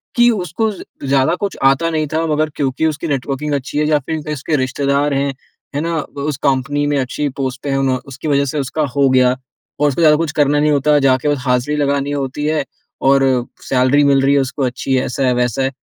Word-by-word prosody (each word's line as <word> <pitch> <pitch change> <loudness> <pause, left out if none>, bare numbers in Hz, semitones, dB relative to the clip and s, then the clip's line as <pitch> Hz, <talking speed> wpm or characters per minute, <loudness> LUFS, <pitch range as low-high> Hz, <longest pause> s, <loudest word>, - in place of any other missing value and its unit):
कि 240 0 +5
उसको 210 +2 -1
ज़ 195 - -9 0.3
ज़्यादा 135 +4 +2
कुछ 200 +1 -4
आता 135 +5 +3
नहीं 155 -2 -1
था, 160 +1 +1
मगर 155 0 +1
क्योंकि 140 +2 -1
उसकी 155 +2 -3
नेटवर्किंग 145 +1 -2
अच्छी 140 +1 -3
है 150 - +2
या 150 -1 +3
फिर 160 +3 -4
कहें, 150 0 -4
उसके 150 +2 -2
रिश्तेदार 140 +2 0
हैं, 140 0 0 0.4
है - - 0
ना? 165 +1 -2
उस 140 -1 -5
कंपनी 140 +2 +1
में 145 - +1
अच्छी 135 +3 -2
पोस्ट 130 -1 -3
पे 145 - -3
हैं, 135 - +1
उन्हों 135 -1 +1
उसकी 135 +3 -7
वज़ह 140 -1 +2
से 145 +2 -2
उसका 140 +3 -2
हो 140 -1 +4
गया। 130 -1 +4 0.4
और 150 - +3
उसको 145 +5 -2
ज़्यादा 155 -2 +6
कुछ 165 -1 -1
करना 145 0 +2
नहीं 150 +1 +2
होता, 150 +1 +3
जाके 135 +1 +2
बस 145 - +1
हाज़री 125 +3 +1
लगानी 140 -1 0
होती 140 +1 -3
है, 155 -1 +1 0.4
और 135 0 +4 0.5
सैलरी 130 +2 +3
मिल 140 -1 +4
रही 135 +1 +3
है 140 - +4
उसको 135 +2 -3
अच्छी, 130 +1 -1
ऐसा 130 +1 -2
है, 125 - +3
वैसा 125 +1 0
है। 135 - 0
140 Hz, 225 wpm, -17 LUFS, 135-150 Hz, 0.5 s, ज़्यादा